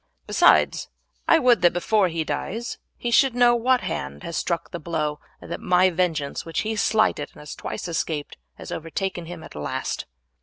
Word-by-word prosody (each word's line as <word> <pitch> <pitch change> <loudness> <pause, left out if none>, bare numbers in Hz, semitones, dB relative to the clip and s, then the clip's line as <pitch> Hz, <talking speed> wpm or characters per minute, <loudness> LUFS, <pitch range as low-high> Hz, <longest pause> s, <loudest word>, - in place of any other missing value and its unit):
Besides, - - +4 0.4
I - - +7
would 250 - +4
that 175 -1 +5
before 195 +3 +2
he 165 -2 -2
dies 210 - -4 0.2
he 240 - -3
should 260 +1 +4
know 245 -1 +5
what 250 +2 +2
hand 70 +1 -4
has 170 - -5
struck 170 -1 -2
the 170 - -5
blow, 150 -2 -2 0.2
and - - -11
that - - -4
my 180 +1 +4
vengeance, 165 -5 -1
which 165 -2 -2
he 220 0 -2
slighted 215 -8 +2
and - - -15
has 150 - -8
twice - - -5
escaped, 160 -3 -3 0.2
has - - -9
overtaken 170 +2 -3
him 175 -1 -8
at - - -11
last." 75 -1 -3
175 Hz, 185 wpm, -24 LUFS, 160-220 Hz, 0.4 s, I